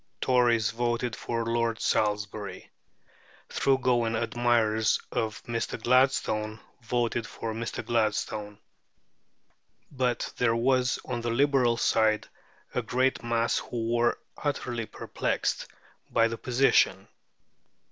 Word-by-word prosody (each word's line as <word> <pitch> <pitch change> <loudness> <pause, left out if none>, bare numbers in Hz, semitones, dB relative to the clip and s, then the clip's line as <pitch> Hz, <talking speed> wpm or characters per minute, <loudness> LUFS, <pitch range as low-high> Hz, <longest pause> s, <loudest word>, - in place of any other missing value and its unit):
Tories 120 -4 +3
voted 120 0 -1
for 115 -1 -3
Lord 115 -1 0
Salisbury; 105 -1 -1 0.8
thorough 135 -1 +2
going 120 -3 +1
admirers 110 -1 +2
of 110 -1 -2
Mr. 115 0 -3
Gladstone 115 -3 +2 0.2
voted 120 0 -1
for 115 -1 -5
Mr. 115 0 -4
Gladstone. 110 -2 -1 1.3
But 125 -3 -1
there 115 -2 +2
was 125 +1 +2
on 120 -2 -3
the 120 - -2
Liberal 125 -1 +3
side 110 -2 +2 0.5
a 125 - 0
great 130 +3 0
mass 115 0 +1
who 115 -1 -3
were 120 0 +2 0.3
utterly 120 -6 -2
perplexed - - -2 0.4
by 115 0 +3
the 115 0 -4
position. 130 +2 +2
115 Hz, 105 wpm, -28 LUFS, 115-125 Hz, 1.3 s, Tories